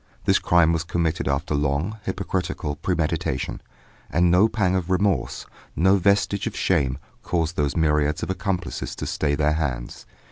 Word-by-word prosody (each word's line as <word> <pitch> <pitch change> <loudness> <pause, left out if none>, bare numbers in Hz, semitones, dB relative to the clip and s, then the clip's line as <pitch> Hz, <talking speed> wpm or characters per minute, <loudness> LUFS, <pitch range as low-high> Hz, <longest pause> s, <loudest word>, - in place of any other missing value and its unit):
This - - +4
crime 85 -1 +4
was 80 0 0
committed 85 -4 -1
after 70 +2 -1
long, 75 +9 -1
hypocritical 95 -6 -2
premeditation, 85 -2 -2 0.5
and 85 +1 +3
no 90 +5 +5
pang 95 -5 0
of 90 -1 -2
remorse, 95 0 0 0.3
no 95 +5 +4
vestige 100 +1 +1
of - - -5
shame, 65 -1 +1 0.2
caused 85 -1 -1
those 75 -1 0
myriads 75 -1 +1
of - - -2
accomplices 95 -2 -3
to - - -5
stay 75 -1 0
their 75 +1 +2
hands. 65 -7 -4
85 Hz, 150 wpm, -24 LUFS, 75-95 Hz, 0.5 s, no